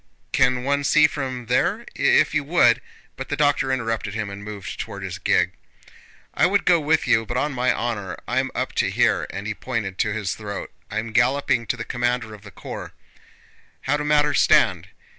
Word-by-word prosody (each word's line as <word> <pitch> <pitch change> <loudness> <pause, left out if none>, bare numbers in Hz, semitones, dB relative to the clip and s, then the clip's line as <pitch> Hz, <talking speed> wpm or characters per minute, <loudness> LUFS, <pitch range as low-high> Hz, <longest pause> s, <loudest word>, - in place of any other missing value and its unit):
"Can 125 0 +2
one 140 +1 0
see 155 +2 +5
from 130 -5 -3
there?... 125 +2 +1
If - - +3
you 145 - +1
would..." 140 -7 +4 0.3
But - - -7
the - - -1
doctor 145 -2 +2
interrupted 115 -5 -2
him 105 -2 -3
and 100 +1 -8
moved 105 -3 -7
toward 100 0 -6
his 95 -1 -5
gig. - - +2 0.8
"I - - +3
would 200 +2 +1
go 175 -2 +5
with 155 +1 +1
you 115 0 +3
but 120 +2 -4
on 145 +2 0
my 125 0 +1
honor 110 -7 -3
I'm - - 0
up - - -2
to - - -1
here"—and 100 - 0
he 110 - -2
pointed 105 -5 -4
to 105 - +1
his 105 -3 -2
throat. 100 -2 -6 0.2
"I'm 110 +2 -3
galloping 120 -1 +2
to 125 - -1
the 110 - -4
commander 120 -2 -1
of 105 - -11
the 100 - -12
corps. - - -8 0.9
How 135 - 0
do 150 - -2
matters 150 -1 +3
stand?... - - +3
120 Hz, 190 wpm, -23 LUFS, 105-140 Hz, 0.9 s, see